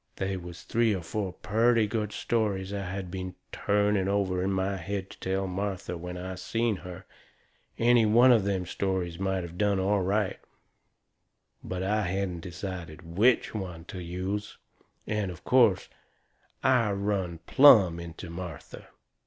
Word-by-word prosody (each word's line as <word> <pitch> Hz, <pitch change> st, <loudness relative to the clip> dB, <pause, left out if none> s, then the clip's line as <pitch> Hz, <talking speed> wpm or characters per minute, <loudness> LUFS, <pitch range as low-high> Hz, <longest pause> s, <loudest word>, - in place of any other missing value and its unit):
They 95 Hz, 0 st, -2 dB
was 90 Hz, -2 st, -8 dB
three 115 Hz, -2 st, +2 dB
or 90 Hz, -, -5 dB
four 95 Hz, +2 st, -3 dB
purty 110 Hz, +3 st, +2 dB
good 105 Hz, -1 st, -2 dB
stories 100 Hz, -5 st, -1 dB
I 100 Hz, -1 st, -3 dB
had 95 Hz, -1 st, -5 dB
been 95 Hz, -1 st, -5 dB, 0.2 s
trying 100 Hz, -1 st, +1 dB
over 95 Hz, -2 st, 0 dB
in 95 Hz, +1 st, 0 dB
my 95 Hz, +1 st, 0 dB
head 95 Hz, +2 st, -4 dB
to -, -, -13 dB
tell 95 Hz, +1 st, -1 dB
Martha 95 Hz, -1 st, -3 dB
when 90 Hz, +1 st, -6 dB
I 95 Hz, +1 st, -5 dB
seen 110 Hz, +4 st, -1 dB
her. 90 Hz, +1 st, -9 dB, 0.7 s
Any 120 Hz, -1 st, +4 dB
one 120 Hz, +4 st, +6 dB
of 115 Hz, -5 st, +5 dB
them 95 Hz, -2 st, -1 dB
stories 90 Hz, -2 st, -2 dB
might 95 Hz, -1 st, -1 dB
of 85 Hz, +1 st, -9 dB
done 100 Hz, -2 st, +2 dB
all 100 Hz, +1 st, +2 dB
right; 100 Hz, +1 st, 0 dB, 1.2 s
but 90 Hz, 0 st, -4 dB
I 105 Hz, +3 st, +1 dB
hadn't 95 Hz, -2 st, -2 dB
decided 85 Hz, -2 st, -7 dB
WHICH 120 Hz, +6 st, +3 dB
one 90 Hz, -6 st, -6 dB
to 90 Hz, 0 st, -7 dB
use. 95 Hz, +4 st, -4 dB, 0.5 s
And, 105 Hz, -3 st, -1 dB
of 90 Hz, -1 st, -9 dB
course, 120 Hz, -7 st, +4 dB, 0.8 s
I 125 Hz, -4 st, +4 dB
run 100 Hz, -4 st, -1 dB
plumb 105 Hz, -12 st, +7 dB
into 85 Hz, +1 st, -8 dB
Martha. 85 Hz, -4 st, -8 dB
95 Hz, 155 wpm, -28 LUFS, 90-105 Hz, 1.2 s, plumb